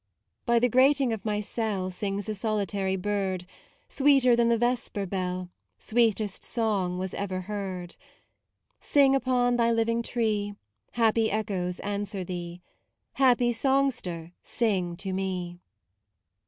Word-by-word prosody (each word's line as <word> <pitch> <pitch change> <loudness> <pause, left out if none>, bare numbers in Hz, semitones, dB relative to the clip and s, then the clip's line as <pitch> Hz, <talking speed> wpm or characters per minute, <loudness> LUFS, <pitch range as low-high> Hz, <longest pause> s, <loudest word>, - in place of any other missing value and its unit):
By 235 0 +4
the 245 +1 +4
grating 260 0 +4
of 220 - -5
my 210 -1 0
cell 205 -4 -2
Sings 200 +2 -3
a 215 - -1
solitary 200 -2 -1
bird: 190 -2 -2 0.4
Sweeter 270 -3 +4
than 235 0 +3
the 235 - +3
vesper 240 -4 -1
befl, 185 -1 -3 0.3
Sweetest 220 -3 0
song 200 -6 0
was 185 0 -4
ever 190 -2 -3
heard.* 185 -3 -5 0.8
Sing 275 -2 +4
upon 250 -2 +2
thy 235 -1 +3
living 230 0 +1
tree: 215 -4 -1 0.4
Happy 225 -1 +2
echoes 190 -4 -2
answer 205 -1 -3
thee, 175 -1 -6 0.5
Happy 245 -2 +3
songster, 235 -10 0
sing 190 -7 -1
to 190 0 -4
me. 180 -2 -3
210 Hz, 125 wpm, -27 LUFS, 185-235 Hz, 0.8 s, By